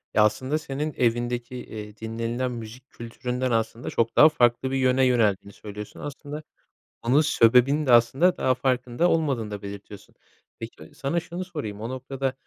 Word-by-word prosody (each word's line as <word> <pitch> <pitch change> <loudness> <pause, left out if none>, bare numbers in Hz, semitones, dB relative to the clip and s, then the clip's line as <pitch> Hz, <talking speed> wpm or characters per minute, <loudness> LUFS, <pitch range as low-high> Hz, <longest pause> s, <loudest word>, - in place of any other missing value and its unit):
Ya, 105 - +6
aslında 130 +7 +1
senin 150 +1 -4
evindeki, 120 +1 0
eee, 105 -3 -8
dinlenilen 115 +3 -3
müzik 120 +2 -9
kültüründen 125 +2 -4
aslında 115 +1 -1
çok 115 0 0
daha 155 - +8
farklı 125 -2 +2
bir - - -1
yöne 130 0 +3
yöneldiğini 105 -5 +1
söylüyorsun. 105 0 -9
Aslında 145 +1 -7 0.6
onun 130 +6 +3
sebebini 135 +1 +4
de 130 - +2
aslında 130 +10 +4
daha 130 - +2
farkında 125 +5 0
olmadığını 135 -10 0
da 100 -1 -5
belirtiyorsun. 100 0 -10 0.4
Peki, 80 - -10
sana 140 +5 -1
şunu 175 +2 -6
sorayım 110 - -6
o 115 - -4
noktada, 130 +1 -3
125 Hz, 155 wpm, -25 LUFS, 115-135 Hz, 0.6 s, daha